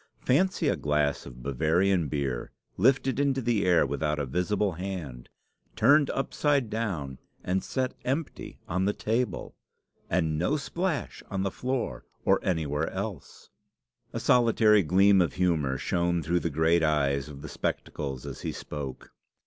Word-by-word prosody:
Fancy 185 Hz, +9 st, +2 dB
a -, -, +2 dB
glass 75 Hz, -1 st, 0 dB
of 60 Hz, -2 st, -11 dB
Bavarian 80 Hz, +6 st, +2 dB
beer 70 Hz, -4 st, -2 dB, 0.3 s
lifted 130 Hz, +5 st, +2 dB
into 140 Hz, -2 st, +2 dB
the 115 Hz, -4 st, +1 dB
air 90 Hz, -4 st, +5 dB
without 75 Hz, +2 st, -1 dB
a 75 Hz, -, -1 dB
visible 95 Hz, +8 st, 0 dB
hand, 85 Hz, -8 st, -6 dB, 0.5 s
turned 140 Hz, +7 st, +5 dB
upside 140 Hz, -3 st, 0 dB
down, 85 Hz, -, -3 dB, 0.2 s
and 95 Hz, +1 st, 0 dB
set 130 Hz, -1 st, -2 dB
empty 135 Hz, +5 st, -3 dB
on 95 Hz, +3 st, 0 dB
the 100 Hz, -, +1 dB
table! 115 Hz, +5 st, -2 dB, 0.6 s
and 80 Hz, -4 st, +1 dB
no 135 Hz, -, +1 dB
splash 165 Hz, -, -3 dB
on 95 Hz, -1 st, -2 dB
the 95 Hz, -, -1 dB
floor 130 Hz, +3 st, -3 dB, 0.2 s
or -, -, +4 dB
anywhere 80 Hz, -3 st, -1 dB
else!" 95 Hz, -4 st, -7 dB, 0.6 s
A -, -, -3 dB
solitary 115 Hz, -3 st, +4 dB
gleam 95 Hz, +3 st, +5 dB
of 85 Hz, -5 st, 0 dB
humour 80 Hz, -7 st, +1 dB
shone 85 Hz, +2 st, 0 dB
through 85 Hz, +3 st, +1 dB
the 85 Hz, -, -2 dB
great 80 Hz, +3 st, +2 dB
eyes 70 Hz, -3 st, +1 dB
of 70 Hz, -1 st, -10 dB
the -, -, -6 dB
spectacles 70 Hz, -2 st, -4 dB
as -, -, -7 dB
he -, -, -3 dB
spoke. 70 Hz, -3 st, -7 dB
90 Hz, 150 wpm, -28 LUFS, 75-115 Hz, 0.6 s, air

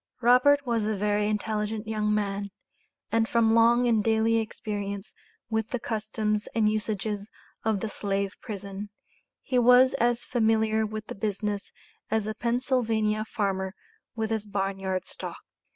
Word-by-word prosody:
Robert 255 Hz, +4 st, +5 dB
was 235 Hz, -3 st, +1 dB
a 215 Hz, 0 st, -1 dB
very 205 Hz, +1 st, +1 dB
intelligent 215 Hz, 0 st, -2 dB
young 215 Hz, -1 st, 0 dB
man, 200 Hz, -1 st, -1 dB, 0.6 s
and 225 Hz, 0 st, +2 dB
from 225 Hz, -1 st, +3 dB
long 235 Hz, +2 st, +5 dB
and 225 Hz, -3 st, +3 dB
daily 225 Hz, +1 st, +3 dB
experience 205 Hz, -2 st, -4 dB, 0.3 s
with 220 Hz, -1 st, -1 dB
the 250 Hz, -, -3 dB
customs 215 Hz, -1 st, -2 dB
and 220 Hz, -2 st, +3 dB
usages 210 Hz, -1 st, -2 dB, 0.3 s
of 215 Hz, -3 st, +1 dB
the -, -, -1 dB
slave 200 Hz, -1 st, -2 dB
prison, 200 Hz, -1 st, -6 dB, 0.5 s
he 255 Hz, -, +1 dB
was 250 Hz, +2 st, +6 dB
as 240 Hz, 0 st, +1 dB
familiar 220 Hz, -2 st, +2 dB
with 215 Hz, 0 st, -6 dB
the -, -, -6 dB
business 205 Hz, 0 st, -3 dB, 0.4 s
as 220 Hz, -1 st, +1 dB
a 215 Hz, -, -2 dB
Pennsylvania 230 Hz, -2 st, 0 dB
farmer 195 Hz, -3 st, -2 dB, 0.4 s
with 220 Hz, -1 st, -2 dB
his 215 Hz, -1 st, -1 dB
barn 195 Hz, -1 st, -2 dB
yard 190 Hz, -1 st, -2 dB
stock. -, -, -7 dB
215 Hz, 145 wpm, -27 LUFS, 205-225 Hz, 0.6 s, was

